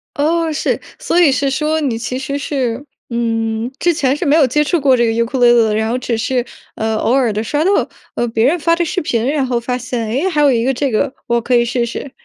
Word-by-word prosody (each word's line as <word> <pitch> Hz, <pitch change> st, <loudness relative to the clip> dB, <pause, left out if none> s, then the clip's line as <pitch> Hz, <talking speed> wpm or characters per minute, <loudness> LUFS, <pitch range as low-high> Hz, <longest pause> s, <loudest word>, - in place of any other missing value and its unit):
哦， 320 Hz, +2 st, +1 dB
是， 300 Hz, -, -1 dB, 0.2 s
所 350 Hz, -, 0 dB
以 315 Hz, -6 st, +5 dB
是 275 Hz, +1 st, 0 dB
说 305 Hz, +3 st, 0 dB
你 260 Hz, -7 st, -1 dB
其 250 Hz, +2 st, -4 dB
实 275 Hz, +1 st, -3 dB
是 265 Hz, -3 st, -2 dB, 0.3 s
嗯， 225 Hz, 0 st, -2 dB
之 345 Hz, -1 st, +2 dB
前 275 Hz, -3 st, +1 dB
是 340 Hz, -, -3 dB
没 290 Hz, +1 st, +4 dB
有 305 Hz, -4 st, +5 dB
接 300 Hz, +4 st, +1 dB
触 335 Hz, +2 st, 0 dB
过 265 Hz, -2 st, +4 dB
这 235 Hz, -, +3 dB
个 225 Hz, -, +1 dB
尤 230 Hz, +1 st, +1 dB
克 255 Hz, +2 st, -3 dB
里 245 Hz, -, +5 dB
里 -, -, +6 dB
的， 215 Hz, -1 st, 0 dB
然 220 Hz, +1 st, 0 dB
后 245 Hz, -, 0 dB
只 245 Hz, -2 st, -2 dB
是， 245 Hz, +2 st, -1 dB, 0.3 s
呃， 220 Hz, 0 st, -1 dB
偶 235 Hz, -, +1 dB
尔 255 Hz, -5 st, +2 dB
地 215 Hz, +2 st, -2 dB
刷 295 Hz, +7 st, -1 dB
到， 385 Hz, -, +2 dB, 0.4 s
呃， 240 Hz, -, 0 dB
别 225 Hz, +1 st, +1 dB
人 335 Hz, +5 st, +2 dB
发 335 Hz, +2 st, +2 dB
的 345 Hz, -, 0 dB
视 365 Hz, +3 st, -2 dB
频， 235 Hz, -6 st, -1 dB
然 280 Hz, -2 st, 0 dB
后 245 Hz, -2 st, -1 dB
发 250 Hz, +1 st, -3 dB
现， 245 Hz, -2 st, -4 dB
哎， 275 Hz, -, 0 dB
还 300 Hz, -4 st, 0 dB
有 285 Hz, -2 st, +5 dB
一 230 Hz, -1 st, +1 dB
个 265 Hz, +1 st, +1 dB
这 270 Hz, 0 st, -1 dB
个 260 Hz, +5 st, 0 dB
我 235 Hz, 0 st, +1 dB
可 245 Hz, +1 st, +1 dB
以 235 Hz, -, +4 dB
试 240 Hz, 0 st, -1 dB
试。 255 Hz, +3 st, -6 dB
255 Hz, 290 characters per minute, -16 LUFS, 235-295 Hz, 0.4 s, 里